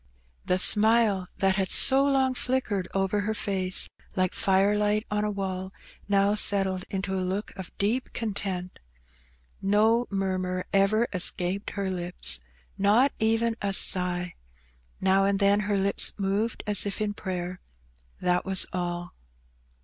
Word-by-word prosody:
The 180 - +1
smile 210 -1 +4
that 190 0 +1
had 190 -1 0
so 270 +1 +6
long 270 -2 +2
flickered 250 -7 -1
over 195 +1 0
her 215 +2 -2
face 190 -3 -1 0.3
like 185 -1 0
firelight 205 +2 +1
on 210 0 0
a 210 - -1
wall, 190 -2 -4 0.3
now 200 0 +2
settled 195 -3 +1
into 195 -1 -3
a 190 - -1
look 190 +3 -3
of 190 -2 -8
deep 225 +6 -1
content. 195 -5 -4 0.8
No 220 +4 +2
murmur 185 -2 -2
ever 205 +4 +2
escaped 185 +1 +1
her 200 -1 -2
lips, 180 - -2 0.4
not 215 +8 +3
even 225 +1 +1
a 200 -1 -1
sigh; 180 -2 +1 0.7
now 190 +1 +3
and 200 0 +1
then 200 +1 +3
her 205 0 -1
lips 195 +1 +2
moved 205 +3 -2
as 205 -1 +1
if 200 - -4
in 210 -1 -2
prayer, 180 -2 -5 0.6
that 180 0 0
was 190 -1 +3
all. 175 -1 -4
195 Hz, 140 wpm, -26 LUFS, 185-210 Hz, 0.8 s, so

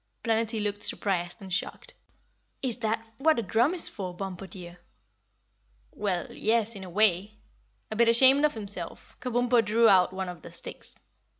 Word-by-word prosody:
Planetty 225 0 0
looked 205 -1 -2
surprised 185 -2 -2
and 190 -1 -7
shocked. 185 - -4 0.7
"Is 245 -3 0
that 225 -1 -2
for - - -12
what 315 -1 +5
a 235 - 0
drum 235 - +2
is 345 - +3
for, 185 -4 -6
Bumpo, 190 0 -6
dear?" 180 -3 -8 1.1
"Well, 190 -4 -2
yes, 225 0 +1
in 195 - -8
a 185 - -8
way." 205 +1 +2 0.6
A - - -3
bit 230 +1 +4
ashamed 265 +4 +6
of 300 -3 +2
himself, 200 -5 -4
Kabumpo 245 -1 +2
drew 225 +2 +4
out 185 -3 +5
one 190 0 -4
of 180 -2 -8
the - - -10
sticks. - - -5
210 Hz, 170 wpm, -28 LUFS, 190-230 Hz, 1.1 s, ashamed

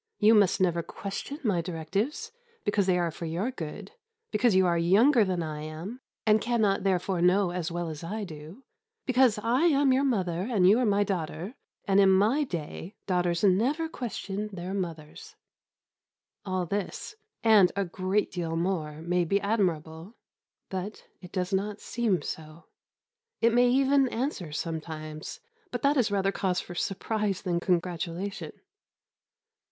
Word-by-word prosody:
You 215 +1 +5
must 205 -5 +4
never 175 -2 +2
question 200 - -6
my 195 -8 +1
directions, 180 - -3 0.3
because 205 -2 +1
they 180 -1 +3
are 170 -2 0
for 165 - -7
your 175 +10 -2
good; 165 - -7 0.4
because 215 -1 +3
you 190 0 +5
are 175 -1 +2
younger 215 +10 +5
than 185 -3 -1
I 155 -1 -5
am, 160 +10 -7 0.3
and 215 -1 +4
cannot 220 -5 +1
therefore 185 -1 0
know 180 +1 +3
as 175 -1 -3
well 175 0 -3
as 155 0 -7
I 210 +6 -4
do; 160 - -10 0.4
because 255 -3 +4
I 240 +9 +1
am 285 -5 +4
your 265 +2 +2
mother 190 -8 0
and 195 -7 +4
you 210 +5 +6
are 250 - +2
my 205 0 +3
daughter; 180 +1 -3 0.3
and, 200 -2 +3
in 195 -1 +6
my 210 +10 +4
day, 175 - -6
daughters 175 -2 0
never 245 - +2
questioned 210 - -4
their 185 0 -5
mothers." 165 -6 -6 1.1
All 185 -1 -1
this, 200 - -4 0.3
and 215 -5 +6
a 200 0 0
great 185 +3 -1
deal 170 -3 -3
more, 165 -3 -2
may 180 +1 +1
be 195 +4 +1
admirable; 180 -3 -1 0.5
but 190 +3 -5 0.2
it 180 - -11
does 185 0 -2
not 205 +2 -1
seem 215 -10 -1
so. 155 +1 -7 0.7
It 230 0 +3
may 245 +1 +5
even 270 +1 +3
answer 225 - -3
sometimes; 155 -1 -5 0.3
but 245 - -5
that 280 +1 +4
is 245 -6 +2
rather 195 -1 +1
cause 185 -2 0
for 175 - -7
surprise 200 +2 -2
than 175 -3 0
congratulation. 180 +2 -2
190 Hz, 155 wpm, -28 LUFS, 170-220 Hz, 1.1 s, you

